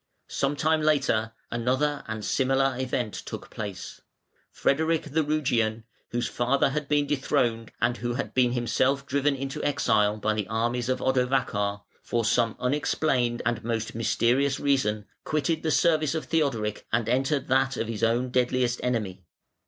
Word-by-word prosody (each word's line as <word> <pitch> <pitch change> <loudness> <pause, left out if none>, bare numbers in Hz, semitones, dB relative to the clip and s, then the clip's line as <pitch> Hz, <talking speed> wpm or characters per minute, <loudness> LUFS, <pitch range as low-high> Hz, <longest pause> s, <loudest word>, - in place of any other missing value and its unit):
Some 140 +1 0
time 155 +2 +2
later 135 -7 +1 0.2
another 130 +5 0
and 110 -1 -4
similar 135 0 +2
event 125 -4 -2
took - - -7
place. 100 -4 -7 0.5
Frederic 160 +3 +1
the 160 +2 +2
Rugian, 120 -7 0 0.3
whose 120 0 -1
father 125 +3 +1
had 150 0 -3
been 145 0 +2
dethroned, 120 -5 0
and 120 +1 +1
who 120 0 -3
had 140 - -4
been 125 -2 +3
himself 130 +3 +1
driven 140 +1 +1
into 135 +2 -5
exile 105 -7 +2
by 110 +1 0
the 105 -3 -2
armies 120 +3 -1
of 130 - -1
Odovacar, 125 -6 0 0.2
for 115 -2 -1
some 115 0 +2
unexplained 125 -2 0
and 120 -1 -1
most 115 -1 -2
mysterious 125 +4 +1
reason, 110 -7 +1 0.2
quitted 155 +1 0
the 160 - -1
service 155 -1 +2
of 155 -4 -3
Theodoric 125 -10 -1
and 115 -1 +1
entered 135 +3 +1
that 135 0 +2
of 115 - -2
his 115 -2 -4
own 120 +2 +1
deadliest 125 -1 +1
enemy. 105 -7 -2
125 Hz, 155 wpm, -26 LUFS, 115-140 Hz, 0.5 s, been